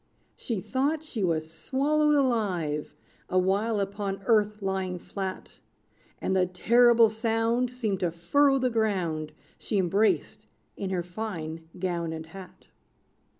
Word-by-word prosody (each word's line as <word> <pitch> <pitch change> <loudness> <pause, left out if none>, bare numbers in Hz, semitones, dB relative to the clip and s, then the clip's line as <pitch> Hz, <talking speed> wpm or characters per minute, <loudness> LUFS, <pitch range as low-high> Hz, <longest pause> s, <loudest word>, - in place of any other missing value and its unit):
She 225 -6 -3
thought 285 - -1
she 240 -9 -4
was 160 -3 0
swallowed 295 - +1
alive, 195 - 0 0.3
Awhile 195 +4 +1
upon 195 0 -3
earth 210 -2 +2
lying 190 -1 -1
flat; 190 +1 -6 0.6
And 190 - -1
the 185 -1 +3
terrible 230 +4 +5
sound 225 +2 0
Seemed 220 -6 -2
to 175 - +1
furrow 270 - +3
the 255 -1 +1
ground 180 -9 -1 0.3
She 210 - -2
embraced 195 +4 +1 0.3
in 195 - -4
her 180 -2 -1
fine 165 -4 -6
gown 170 -3 -2
and 160 0 -6
hat. 185 +3 -13
200 Hz, 125 wpm, -27 LUFS, 180-230 Hz, 0.6 s, terrible